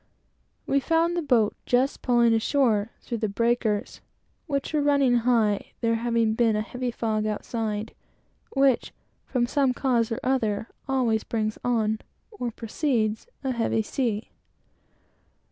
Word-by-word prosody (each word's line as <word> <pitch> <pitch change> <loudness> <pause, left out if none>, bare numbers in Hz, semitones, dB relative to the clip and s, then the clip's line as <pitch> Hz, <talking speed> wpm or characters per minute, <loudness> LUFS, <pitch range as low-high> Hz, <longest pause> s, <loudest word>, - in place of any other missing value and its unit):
We 275 - +2
found 330 +4 +1
the 345 - 0
boat 245 -8 +2
just 255 +3 +1
pulling 240 -2 +4
ashore 225 -2 +2
through 235 -2 -4
the 215 - 0
breakers, 230 -1 0 0.5
which 280 0 -2
were 300 - +2
running 280 -4 +3
high, 225 -4 +1
there 230 -1 +2
having 230 -1 +1
been 225 -1 +2
a 215 - 0
heavy 250 +2 -4
fog 220 -2 -1
outside, 215 0 -3 0.6
which, 270 -3 +2 0.3
from 245 -2 +1
some 265 0 +1
cause 235 -4 +1
or 225 - -1
other, 225 -5 0 0.2
always 240 -5 +1
brings 215 -1 -2
on, 220 -3 +1 0.3
or 330 - -4
precedes 225 - -1 0.2
a 265 - 0
heavy 230 -2 0
sea. 225 -2 -2
235 Hz, 135 wpm, -26 LUFS, 220-260 Hz, 0.6 s, pulling